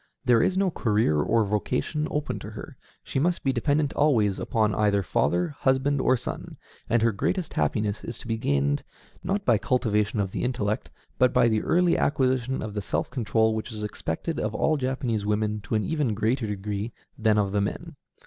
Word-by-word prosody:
There 120 -3 +5
is 185 - +1
no 195 -2 +2
career 105 - +1
or 115 +9 +2
vocation 105 +9 -1
open 150 0 -2
to - - -8
her: - - -9 0.3
she - - -2
must 175 +4 0
be 135 - +1
dependent 145 +4 +1
always 115 -10 +2
upon 110 -2 +1
either 100 -2 +2
father, 85 +2 +1
husband, 130 +1 +2
or 130 - +3
son, - - -6 0.3
and 115 0 +3
her 115 - +4
greatest 170 - -2
happiness 100 +7 0
is 115 - -6
to - - -11
be 115 - 0
gained, 70 -4 +1 0.4
not 200 +1 -1
by 115 -4 +4
cultivation 110 -4 +1
of 95 -2 -1
the - - -3
intellect, 110 -4 -1 0.3
but 125 -1 +5
by 125 -1 +4
the 110 -2 +2
early 175 0 +2
acquisition 130 -2 +1
of 110 -1 -5
the 105 - -2
self 95 - -2
control 110 -3 +1
which 110 +3 -4
is 105 -1 -5
expected 105 - -3
of - - -2
all 160 - +2
Japanese 130 -5 -1
women 105 0 0
to 100 +3 -3
an 105 - +1
even 150 -9 0
greater 110 +3 0
degree 105 +2 -4 0.2
than 110 -1 +2
of 100 -2 +1
the 100 0 +1
men. 100 - -4
110 Hz, 195 wpm, -26 LUFS, 105-130 Hz, 0.4 s, There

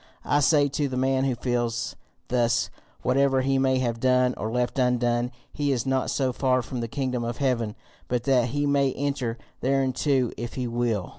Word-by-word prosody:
I 145 - +3
say 145 0 +4
to 145 +1 -1
the 130 -1 -4
man 130 +1 +2
who 130 -2 +1
feels 120 -1 -1 0.3
thus, 120 -1 +1 0.3
whatever 135 +1 +3
he 135 0 +1
may 130 -1 +2
have 120 -3 -1
done 125 0 +3
or 110 - -4
left 125 +2 -1
undone, 120 -1 +1 0.2
he 145 -1 0
is 125 -2 0
not 130 -1 0
so 130 -2 0
far 130 -1 +1
from 125 -1 -5
the 115 - -2
kingdom 125 0 -2
of 120 0 -3
heaven 120 -6 0 0.3
but 120 -1 -1
that 125 -2 +3
he 145 +4 -1
may 140 -2 +2
enter 135 -4 -2 0.2
thereinto 135 -1 +1
if 120 0 -5
he 125 - -2
will. 115 -5 -1
125 Hz, 190 wpm, -26 LUFS, 120-135 Hz, 0.3 s, say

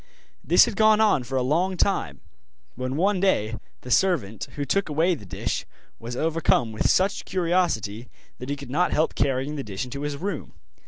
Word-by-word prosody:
This - - +6
had - - -4
gone 215 0 +5
on 215 -10 +4
for 130 +2 -6
a 130 - +1
long 175 +8 +1
time, 90 - 0 0.5
when 130 +2 -4
one 190 +4 +2
day 115 - +1 0.3
the 125 - -8
servant, 135 - +1
who 145 - -2
took 195 +6 0
away 160 +5 +2
the 105 - -8
dish, - - -3 0.4
was 120 +2 -6
overcome 155 -6 +1
with 110 - 0
such 195 +1 +2
curiosity 165 - -1 0.3
that 125 - -7
he 145 - -1
could 140 -3 -10
not 180 +6 +1
help 155 - +1
carrying 135 +2 -1
the 140 - -3
dish 100 0 -5
into 140 +3 -7
his 145 -1 -3
room. 185 -2 -5
145 Hz, 190 wpm, -25 LUFS, 125-185 Hz, 0.5 s, This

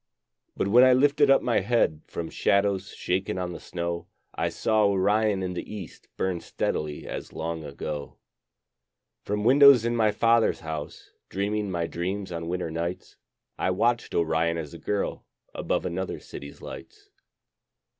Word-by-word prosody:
But - - 0
when 120 +5 +7
I 130 0 +7
lifted 145 +2 +4
up 135 - +5
my 120 - +2
head 115 -10 +1
From 85 -1 -5
shadows 100 0 +1
shaken 95 +1 -2
on 90 -1 -3
the - - -7
snow, 85 -1 -4 0.3
I - - -1
saw 110 -1 +2
Orion 100 +1 +2
in 90 -1 -2
the 90 - -6
east 95 -8 -9
Burn 95 -2 -1
steadily 75 -2 -3
as - - -6
long 80 0 -4
ago. 75 0 -6 1.0
From 105 +1 -2
windows 135 -1 +7
in 120 0 0
my 110 -2 +3
father's 115 +1 +3
house, 80 -2 -7 0.2
Dreaming 100 +1 -1
my 85 -2 -1
dreams 95 +4 -4
on 85 -1 -4
winter 90 -2 -2
nights, 85 +3 -4 0.4
I - - +1
watched 115 +6 0
Orion 85 0 +1
as 75 -3 -6
a - - -9
girl 105 -1 -2 0.3
Above - - -1
another 90 +1 -3
city's 70 0 -10
lights. - - -10
95 Hz, 155 wpm, -26 LUFS, 85-110 Hz, 1.0 s, when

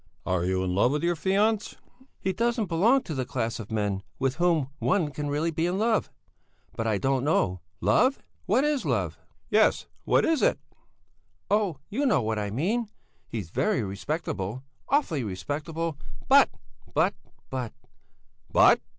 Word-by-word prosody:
"Are 90 -2 0
you 95 0 0
in 90 -1 -1
love 110 +8 +3
with 150 - -1
your 175 0 +3
fiancé?" 200 +5 +1 0.4
"He 190 - -1
doesn't 230 +2 +1
belong 205 +10 +3
to 160 - -5
the 130 -2 -1
class 120 -2 -2
of 110 -1 -8
men 105 -3 -1 0.2
with 135 -1 0
whom 170 -6 +2
one 150 - +1
can 145 +1 -4
really 155 +4 0
be 165 +2 0
in 180 +2 -1
love. 220 +1 +1 0.7
But 115 - -2
I 110 -2 +2
don't 135 +4 +1
know. 95 - +1 0.2
Love? 260 +2 +4
Hm! - - -29 0.2
What 230 +9 +3
is 295 -2 +1
love?" - - -1 0.3
"Yes, - - +4 0.2
what - - +3
is 320 -4 +2
it?" - - +3 0.9
"Oh, 205 -7 +2
you 275 +8 0
know 140 - +3
what 110 0 -1
I 105 -1 -2
mean. 200 - -1 0.4
He's 100 -8 -5
very 210 - +1
respectable, 125 - -3 0.3
awfully 190 - +1
respectable, 150 - -4 0.3
but, - - +7 0.5
but, - - +3 0.4
but...." 125 -4 -3 0.8
"But?" - - +6
150 Hz, 160 wpm, -27 LUFS, -, 0.9 s, but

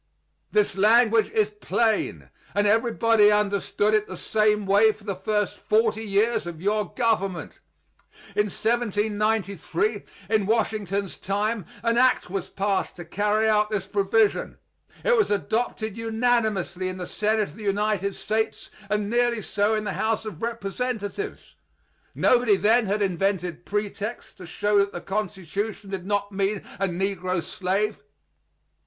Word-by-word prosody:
This 210 -2 +2
language 225 +2 +4
is 215 -1 +1
plain, 215 +1 -1 0.2
and 205 0 +2
everybody 225 -1 +4
understood 210 0 +1
it 215 -1 +2
the - - -7
same 210 -1 +1
way 205 +3 +5
for 215 0 -17
the 200 -2 -3
first 210 +2 -1
forty 220 0 +1
years 210 0 +1
of 170 -2 -7
your 205 +1 0
government. 195 -8 -1 0.8
In 210 - +3
1793, 210 -3 0 0.3
in 215 -2 +1
Washington's 205 -3 -1
time, 205 +1 -1 0.2
an 230 0 +2
act 255 -7 +3
was 195 -2 -3
passed 195 0 -1
to 175 - -8
carry 210 +5 +1
out 210 -1 +3
this 205 -3 -2
provision. 200 +2 +1 0.5
It - - +4
was 425 -3 +2
adopted 220 +1 -1
unanimously 220 -5 0
in 185 0 -4
the 180 - -5
Senate 215 +2 0
of - - -15
the 220 - -11
United 200 -1 0
States, 220 +1 -2 0.2
and 210 -1 0
nearly 240 -1 +1
so 205 +2 +1
in 215 - -1
the 205 -2 -3
House 220 0 -1
of 195 -8 -7
Representatives. 230 - -4 0.6
Nobody 240 -4 +4
then 220 +3 +3
had 205 +1 +1
invented 180 -2 -1
pretexts 210 +2 -4
to 180 - -11
show 205 +4 +1
that 200 0 +1
the 175 - -5
Constitution 200 0 -4
did 190 -1 -5
not 205 0 -1
mean 195 +1 -1 0.2
a 195 - +1
negro 185 -1 -2
slave. 195 +3 -1
210 Hz, 140 wpm, -25 LUFS, 195-220 Hz, 0.8 s, way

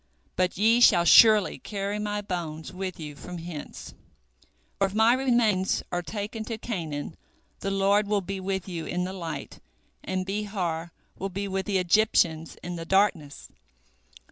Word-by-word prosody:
But 180 -1 0
ye 225 +4 +4
shall 175 -7 +6
surely 215 +3 +7
carry 200 0 -4
my 210 0 -2
bones 170 -5 -5
with 185 -1 -5
you 150 -2 -7
from 180 +4 -8
hence, 165 -3 -8 0.9
for 195 - +3
if 195 - -9
my 220 +2 +5
remains 235 -7 +2
are 175 - -1
taken 215 +4 -5
to 225 0 -4
Canaan, 165 -9 -5 0.4
the 195 - -3
Lord 200 +1 +2
will 205 -1 +1
be 195 +1 -5
with 190 0 -3
you 170 -3 -5
in 180 0 -1
the 185 +1 -4
light, 170 -4 -6 0.4
and 185 0 -2
Behar 190 -5 -3 0.3
will 195 - -3
be 200 +2 -4
with 190 0 -3
the 200 -2 +1
Egyptians 175 -4 +2
in 175 0 -5
the 165 - -6
darkness. 175 -6 0
190 Hz, 160 wpm, -26 LUFS, 175-210 Hz, 0.9 s, surely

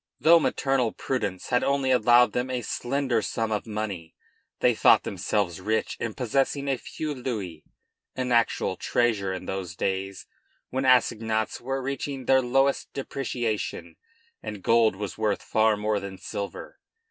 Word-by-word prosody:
Though 170 +1 +7
maternal 135 -6 0
prudence 100 -8 -3
had 125 -1 +2
only 140 -1 +1
allowed 120 0 +5
them 125 +1 -1
a 125 -2 -2
slender 130 0 -1
sum 110 +1 -2
of 105 +1 -2
money 105 -6 -5 0.4
they - - +4
thought - - +5
themselves 95 -4 -2
rich 110 +3 -1
in 115 -2 -3
possessing 135 +3 0
a 135 -2 0
few 155 -1 -5
louis, 105 - -5 0.5
an 130 -1 -2
actual 115 -1 +1
treasure 110 -6 0
in 95 - -5
those 95 -2 -4
days 95 +1 -3 0.5
when 130 +1 -1
assignats 110 -3 +2
were 135 +2 -3
reaching 135 0 -4
their 130 +1 +5
lowest 135 +2 +1
depreciation 115 -11 -3 0.5
and 105 -3 -7
gold 115 -3 +4
was 100 -1 -6
worth 105 -2 0
far 110 -1 +2
more 105 0 0
than 100 -1 -7
silver. 100 +1 -6
115 Hz, 145 wpm, -26 LUFS, 105-130 Hz, 0.5 s, Though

